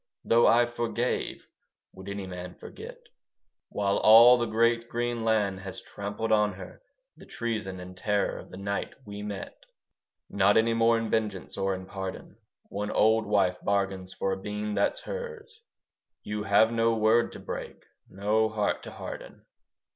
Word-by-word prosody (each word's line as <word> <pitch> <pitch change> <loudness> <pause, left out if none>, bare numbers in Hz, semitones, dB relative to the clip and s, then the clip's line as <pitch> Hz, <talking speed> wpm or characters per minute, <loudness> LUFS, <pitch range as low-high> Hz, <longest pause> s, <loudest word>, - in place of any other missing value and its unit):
Though 115 +1 +5
I 120 +1 +5
forgave, 120 +1 -2 0.5
would 95 +1 -10
any 100 -1 -4
man 90 -1 -7
forget? - - -10 0.7
While 100 -1 0
all 115 +3 +8
the 120 - 0
great 115 +1 +2
green 120 -1 -2
land 105 -4 +1
has 95 -1 -7
trampled 100 +2 -5
on 105 -1 +3
her 95 - -11 0.4
The - - -14
treason 110 -6 -4
and 90 0 -9
terror 105 +2 -1
of - - -12
the 90 - -10
night 100 +1 -3
we 100 0 -7
met. 105 -2 -7 0.6
Not 100 +1 +3
any 115 +1 +3
more 115 0 +4
in 115 -1 -3
vengeance 105 -5 -2
or 95 0 0
in 95 0 -8
pardon, 95 0 -7 0.3
One 105 +1 -3
old 110 0 +3
wife 95 -3 +2
bargains 95 -2 -1
for 95 - -2
a 95 0 -3
bean 105 +1 -4
that's - - 0
hers. 465 -2 -7 0.6
You 105 0 -4
have 110 +2 +4
no 115 0 +2
word 110 +2 +3
to - - -9
break: - - -7 0.2
no 105 +3 +1
heart 105 -1 -1
to - - -9
harden. - - -9
105 Hz, 160 wpm, -28 LUFS, 100-115 Hz, 0.7 s, all